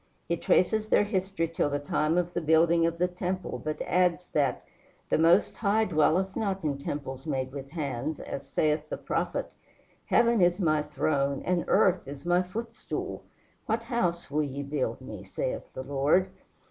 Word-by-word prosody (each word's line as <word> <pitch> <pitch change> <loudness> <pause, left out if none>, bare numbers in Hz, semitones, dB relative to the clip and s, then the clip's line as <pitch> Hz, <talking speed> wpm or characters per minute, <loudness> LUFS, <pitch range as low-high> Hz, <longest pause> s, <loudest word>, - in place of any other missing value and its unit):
He 170 - +1
traces 215 +5 +2
their - - +5
history 190 -4 -1
till 165 -2 0
the 145 - 0
time 150 +3 0
of 175 0 0
the 175 - -1
building 165 +1 +4
of 170 0 -3
the 180 +1 +2
temple, 180 0 -4
but 155 0 -3
adds 180 0 +1
that 140 -4 0 0.5
"the - - +3
Most 170 +5 +4
High 220 +1 +2
dwelleth 180 +2 +2
not 195 -3 -1
in 145 -3 -1
temples 140 -1 -5
made 130 -3 -2
with 135 0 -7
hands, 145 -1 -3
as 140 0 -6
saith 155 0 0
the - - -3
prophet: - - -2 0.5
Heaven 235 -3 +4
is 175 +1 +3
my 155 -4 +2
throne 140 -2 0
and 180 -1 +1
earth 185 -6 +3
is 140 +3 -8
my 175 +1 +3
footstool: 225 +5 -5 0.4
what 225 +1 0
house 180 - -1
will 150 +2 +1
ye 140 -1 -3
build 140 -1 -2
me? - - -8
saith - - -4
the 130 - -4
Lord. 145 +7 +2
165 Hz, 170 wpm, -28 LUFS, 145-185 Hz, 0.5 s, their